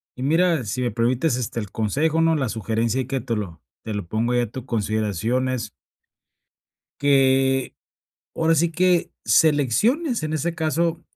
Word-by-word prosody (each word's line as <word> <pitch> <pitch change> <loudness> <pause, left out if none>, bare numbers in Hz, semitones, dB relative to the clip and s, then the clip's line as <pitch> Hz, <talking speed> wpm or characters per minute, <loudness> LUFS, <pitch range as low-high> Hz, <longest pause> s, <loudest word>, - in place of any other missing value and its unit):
Y 125 - -6
mira, 165 0 +2
si 110 +5 -3
me 120 - 0
permites, 120 +5 +1
este, 120 -1 -3
el 105 -4 -6
consejo, 150 +9 0
¿no? 165 0 +3
La 135 -6 -1
sugerencia 115 +3 -1
y 125 - -6
que 135 -1 -2
te 115 -1 -2
lo 90 -7 -6 0.2
te 110 - -5
lo 105 -3 -4
pongo 115 +6 -1
ahí 120 - +2
a 120 -3 -4
tu 130 -1 -7
consideración, 110 +1 -1
es 130 -2 -3 1.3
Que, 135 -1 +2 0.6
ahora 165 0 +2
sí 165 +2 +2
que, 180 +1 +2
selecciones, 160 - +2
en 155 0 -3
ese 165 +2 -1
caso 165 +1 -1
130 Hz, 165 wpm, -23 LUFS, 115-160 Hz, 1.3 s, no